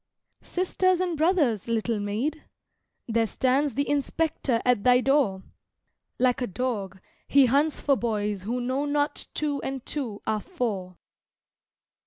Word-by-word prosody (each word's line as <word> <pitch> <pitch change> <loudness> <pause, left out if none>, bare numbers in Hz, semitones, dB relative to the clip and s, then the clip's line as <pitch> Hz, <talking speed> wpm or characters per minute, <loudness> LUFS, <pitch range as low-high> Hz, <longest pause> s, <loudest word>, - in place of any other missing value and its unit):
"Sisters 370 0 +1
and 360 -2 0
brothers, 305 - +2
little 230 -1 0
Maid? 230 +10 -2 0.6
There 225 -1 +1
stands 265 +4 +1
the 280 +1 0
Inspector 290 -3 0
at 250 -5 +3
thy 250 0 +6
door: 255 -8 +2 0.7
Like 250 0 +2
a 245 - 0
dog, 200 -3 -3 0.3
he 280 -1 +6
hunts 285 +5 +2
for 280 - +3
boys 210 -5 -2
who 235 +6 -2
know 260 +4 -1
not 290 0 -1
two 290 -2 -1
and 265 -2 -5
two 240 -9 -4
are 215 -1 0
four." 200 - -4
255 Hz, 135 wpm, -26 LUFS, 220-290 Hz, 0.7 s, thy